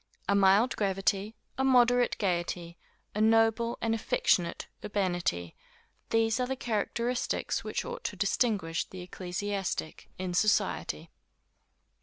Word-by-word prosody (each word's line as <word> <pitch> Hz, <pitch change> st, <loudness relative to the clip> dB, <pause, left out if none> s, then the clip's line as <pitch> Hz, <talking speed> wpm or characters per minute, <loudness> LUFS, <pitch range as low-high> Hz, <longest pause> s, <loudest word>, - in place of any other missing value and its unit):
A -, -, +3 dB
mild 200 Hz, +4 st, +4 dB
gravity, 195 Hz, +1 st, 0 dB, 0.2 s
a -, -, +2 dB
moderate 245 Hz, -2 st, +4 dB
gaiety, 175 Hz, -3 st, -2 dB, 0.4 s
a 210 Hz, -, -1 dB
noble 225 Hz, +1 st, +3 dB
and 225 Hz, 0 st, +2 dB
affectionate 180 Hz, -5 st, +1 dB, 0.2 s
urbanity 175 Hz, -, -1 dB, 0.5 s
these 225 Hz, +1 st, +2 dB
are 250 Hz, -, 0 dB
the 265 Hz, -, -2 dB
characteristics 235 Hz, +1 st, -1 dB
which -, -, -3 dB
ought 485 Hz, 0 st, -6 dB
to -, -, -2 dB
distinguish 195 Hz, -9 st, 0 dB
the 185 Hz, -, -9 dB
ecclesiastic, 185 Hz, -1 st, -4 dB
in 185 Hz, -1 st, -3 dB
society. 210 Hz, +4 st, +1 dB
205 Hz, 115 wpm, -30 LUFS, 185-230 Hz, 0.5 s, mild